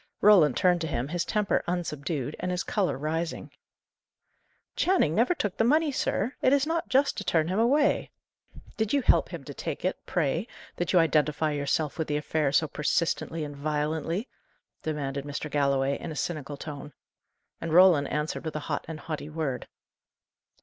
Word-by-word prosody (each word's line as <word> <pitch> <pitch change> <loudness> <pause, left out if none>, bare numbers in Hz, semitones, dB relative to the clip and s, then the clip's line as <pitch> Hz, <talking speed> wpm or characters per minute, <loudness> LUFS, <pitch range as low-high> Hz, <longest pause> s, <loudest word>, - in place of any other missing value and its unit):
Roland 180 -10 +6
turned 180 -2 +3
to 160 - -1
him, 130 -2 -2
his 175 +1 -1
temper 210 -2 0
unsubdued, 155 -5 -3
and 180 - -2
his 180 -1 -1
colour 195 -8 0
rising. 160 +3 -3 1.2
"Channing 375 - +2
never 240 - +3
took 205 - -2
the - - +3
money, 300 +5 +3
sir! 255 -2 -1
It 260 - +4
is 280 0 +3
not 330 +2 -2
just 270 -2 +2
to 205 - -3
turn 160 -4 +1
him 190 +3 0
away." 280 +6 +3 0.7
"Did 220 +1 0
you 280 -2 +2
help - - +3
him 170 -5 -7
to 145 - -8
take - - -5
it, 185 - -2
pray, 170 - 0 0.3
that 175 - -1
you 185 - +4
identify 155 -2 +2
yourself 145 +2 -1
with 160 - -1
the 150 - 0
affair 150 -1 0
so 155 +2 +3
persistently 160 +2 -1
and 145 -1 -6
violently?" 155 - -2 0.5
demanded 140 -3 -3
Mr. 145 +1 -5
Galloway, 140 -1 +1
in - - -6
a - - -6
cynical 150 -2 -4
tone. 145 0 -8 0.7
And 165 - -3
Roland 170 -4 +6
answered 150 +1 -2
with 160 -2 -5
a - - -1
hot - - -2
and 160 -1 -7
haughty 155 -2 -5
word. 155 -5 -3
160 Hz, 175 wpm, -27 LUFS, 150-190 Hz, 1.2 s, Roland